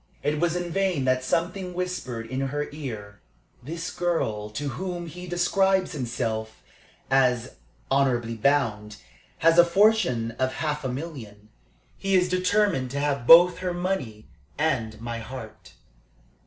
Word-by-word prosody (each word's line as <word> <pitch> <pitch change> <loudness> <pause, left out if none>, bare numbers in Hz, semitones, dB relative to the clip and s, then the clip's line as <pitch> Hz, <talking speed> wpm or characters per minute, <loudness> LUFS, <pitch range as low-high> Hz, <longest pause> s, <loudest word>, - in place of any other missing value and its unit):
It 150 +1 0
was 170 0 +1
in 175 -1 -3
vain 185 -7 0
that 130 0 +2
something 180 +5 -2
whispered 175 -11 -4
in 130 +3 -4
her 145 +2 -2
ear: 110 -9 -7 0.4
"This 165 +6 -5
girl 110 -12 -1
to 140 +7 -4
whom 180 +2 -4
he 180 +2 -9
describes 190 +2 +2
himself 115 -6 -4 0.5
as 125 -3 +2 0.4
'honorably 125 -4 +1
bound' 110 -4 0 0.5
has 165 +1 +6
a - - +10
fortune 170 - +3
of 130 0 0
half 150 -1 -2
a 130 - -2
million. 125 -8 -7 0.5
He 195 0 +1
is 180 -1 +3
determined 185 -6 +1
to 140 +2 -3
have 140 -4 -1
both 175 +2 +8
her 180 -1 -2
money 145 - -3 0.3
and 115 -8 -1
my 115 0 -5
heart." 110 -2 -10
145 Hz, 140 wpm, -25 LUFS, 120-175 Hz, 0.5 s, a